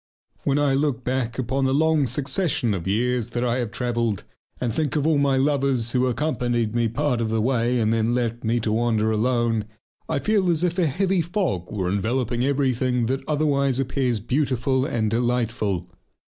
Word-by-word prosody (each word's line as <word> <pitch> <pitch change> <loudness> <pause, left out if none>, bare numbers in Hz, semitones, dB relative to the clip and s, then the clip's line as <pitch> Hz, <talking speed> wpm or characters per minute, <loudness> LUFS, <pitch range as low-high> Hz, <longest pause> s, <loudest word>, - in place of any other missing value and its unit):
When 140 0 +2
I 145 -2 +2
look 135 -3 0
back 125 -2 -2
upon 130 +2 -1
the 130 0 +2
long 155 -2 +3
succession 135 - 0
of 95 -2 -4
years 120 +3 0
that 120 0 -2
I 125 +1 0
have 120 -3 -2
travelled, 115 -3 -1 0.4
and 120 -3 -1
think 155 +1 -1
of 150 -1 +1
all 155 -2 +3
my 140 -1 +2
lovers 135 -4 +1
who 130 0 +2
accompanied 120 -5 -1
me 120 -1 +1
part 125 +1 -1
of 115 - -1
the 110 0 0
way, 120 +1 +1
and 110 0 +2
then 115 +1 +1
left 120 -1 -2
me 115 +1 +1
to 110 - -1
wander 110 -1 +1
alone, 115 -1 +1 0.4
I 160 - 0
feel 200 +3 +1
as 170 -1 +1
if 175 +1 0
a 170 - +3
heavy 185 +5 +1
fog 170 - -2
were 95 -4 -2
enveloping 120 +5 -1
everything 130 -3 +1
that 130 +3 -1
otherwise 140 -3 +1
appears 130 -3 0
beautiful 130 +2 0
and 110 -6 -1
delightful.... 115 -6 -1
125 Hz, 185 wpm, -23 LUFS, 115-140 Hz, 0.4 s, long